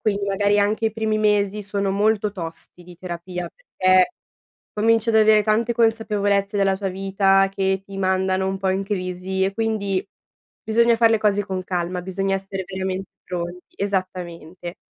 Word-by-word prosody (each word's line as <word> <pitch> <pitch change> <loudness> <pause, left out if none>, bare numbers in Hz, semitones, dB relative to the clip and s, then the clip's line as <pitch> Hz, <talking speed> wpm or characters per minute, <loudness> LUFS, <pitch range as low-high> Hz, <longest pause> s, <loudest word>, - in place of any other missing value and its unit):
quindi, 200 -2 0
magari, 205 +1 +2
anche 210 +2 +1
i 220 - -1
primi 220 -1 -1
mesi 210 -1 +1
sono 200 0 -1
molto 210 +1 +1
tosti 175 -1 -7
di 175 0 -14
terapia, 175 0 -6
perché 185 - +2 0.6
cominci 225 +1 +2
ad 225 - +2
avere 215 -1 +5
tante 225 +3 +1
consapevolezze 210 -3 +1
della 195 -1 +2
tua 195 0 -3
vita 195 0 +2
che 190 0 0
ti 195 0 -9
mandano 190 0 +1
un 190 0 -2
po' 190 0 -1
in 190 +1 0
crisi, 185 -1 -2
e 195 +1 0
quindi, 205 -3 -1 0.6
bisogna 235 +1 +3
far 230 0 +4
le 225 - +3
cose 205 -1 +1
con 190 -2 -4
calma, 180 0 -2
bisogna 195 +1 -1
essere 195 0 -5
veramente 190 0 -4 0.2
pronti 175 0 -6
esattamente. 180 -3 -4
195 Hz, 160 wpm, -22 LUFS, 185-210 Hz, 0.6 s, avere